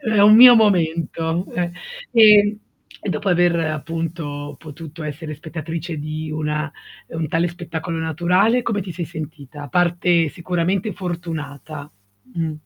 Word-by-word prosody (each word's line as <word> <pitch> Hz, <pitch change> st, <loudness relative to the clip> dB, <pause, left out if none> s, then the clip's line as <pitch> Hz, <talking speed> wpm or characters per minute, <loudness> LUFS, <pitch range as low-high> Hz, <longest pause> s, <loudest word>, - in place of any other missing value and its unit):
É 215 Hz, -2 st, +4 dB
un 210 Hz, +1 st, +8 dB
mio 245 Hz, 0 st, +10 dB
momento, 170 Hz, -4 st, +1 dB
eh. 175 Hz, -1 st, -1 dB, 0.4 s
E 225 Hz, -2 st, +8 dB, 0.8 s
e -, -, -4 dB
dopo 180 Hz, +4 st, -2 dB
aver, 175 Hz, -1 st, +3 dB
appunto, 155 Hz, -2 st, -4 dB
potuto 155 Hz, +1 st, -10 dB
essere 150 Hz, +1 st, -6 dB
spettatrice 160 Hz, +1 st, -6 dB
di 155 Hz, +1 st, -5 dB
una 150 Hz, 0 st, -2 dB, 0.4 s
mhmm, 165 Hz, -, -7 dB
un 155 Hz, -, -2 dB
tale 170 Hz, +2 st, +1 dB
spettacolo 170 Hz, -1 st, -5 dB
naturale, 180 Hz, +9 st, +2 dB
come 210 Hz, -3 st, -1 dB
ti 180 Hz, -2 st, -6 dB
sei 170 Hz, 0 st, -4 dB
sentita? 150 Hz, -3 st, -9 dB
A 145 Hz, -, -8 dB
parte 175 Hz, 0 st, +2 dB
sicuramente 180 Hz, +5 st, -2 dB
fortunata. 155 Hz, -5 st, -6 dB, 0.4 s
Mh. 165 Hz, -2 st, -2 dB
165 Hz, 135 wpm, -20 LUFS, 155-175 Hz, 0.8 s, mio